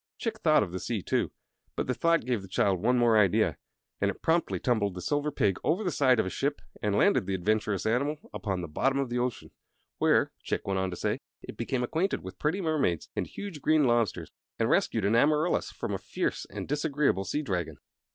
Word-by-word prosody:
Chick 225 -2 -3
thought 155 - +4
of 90 - -5
the 95 - -4
sea, 110 -3 -3
too, - - 0 0.5
but - - -1
the 125 - 0
thought 165 +3 +2
gave 125 -4 0
the 95 - -10
child 95 -1 +1
one 125 +4 +3
more 115 -2 +5
idea, 100 -4 +3 0.4
and 100 - +3
it 100 - -6
promptly 165 +1 +1
tumbled 105 -7 0
the - - -5
Silver 145 +8 0
Pig 100 -9 +1
over 175 +8 +1
the 180 - 0
side 130 -5 +3
of - - +2
a - - -2
ship 145 +1 -1 0.2
and 105 -1 0
landed 110 -2 +3
the 95 - 0
adventurous 105 +1 0
animal 140 +7 +1 0.2
upon 95 -4 -2
the 85 - -5
bottom 135 - 0
of 135 -2 -1
the 120 - 0
ocean, 125 -1 -3 0.5
where - - +3
(Chick - - -3
went 95 -1 0
on 95 0 0
to 90 - -5
say) - - -1 0.2
it - - -8
became 125 -2 -2
acquainted 165 +10 -1
with 95 0 -9
pretty 160 +6 0
mermaids 150 - 0
and - - -1
huge 195 -8 -7
green 155 +1 +4
lobsters, 120 -6 +1 0.3
and - - +1
rescued 110 -4 +2
an 100 - +2
amarylis 150 +7 +2
from - - -4
a - - -2
fierce - - -3
and - - -6
disagreeable 145 - +1
sea 145 +11 -2
dragon. 90 - -3
120 Hz, 220 wpm, -29 LUFS, 100-150 Hz, 0.5 s, more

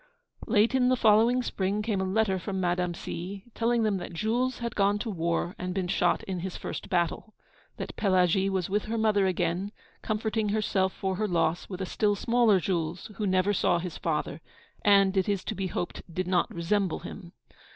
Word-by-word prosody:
Late 220 +3 +3
in 255 -1 +3
the 255 - +4
following 230 +2 +4
spring 200 -1 -1
came 210 -3 0
a - - 0
letter 190 0 +1
from 190 +1 -4
Madame 180 -1 0
C., 190 +4 -6
telling 235 0 +1
them 210 -3 +1
that 175 -1 -7
Jules 240 +8 0
had 235 -1 -4
gone 200 0 +3
to 225 +2 -4
the 205 - -4
war, 170 +1 -1
and 180 0 -3
been 190 -2 -1
shot 175 -1 +1
in 185 -2 -4
his 185 +1 -5
first - - -6
battle; 175 +5 -1 0.4
that - - -6
Pelagie 190 -1 +3
was 190 -3 -1
with 205 +2 -1
her 230 +1 -2
mother 210 -3 +3
again, 185 +2 -1 0.3
comforting 215 0 -1
herself 200 -3 +1
for 190 -1 -3
her 215 +1 0
loss 170 -2 0
with 190 -1 -6
a - - -1
still 205 +2 +1
smaller 230 -2 +3
Jules, 175 +1 -2
who 210 - -1
never 185 +2 +2
saw 175 - +2
his 175 -2 -5
father, 155 -1 -2 0.4
and, 200 -1 +5
it 190 +1 +1
is 200 -2 0
to - - -3
be 195 -1 -3
hoped, 175 0 -4
did 185 +2 -2
not 180 -2 +2
resemble 180 +2 0
him. 175 0 -9
195 Hz, 200 wpm, -28 LUFS, 180-215 Hz, 0.4 s, and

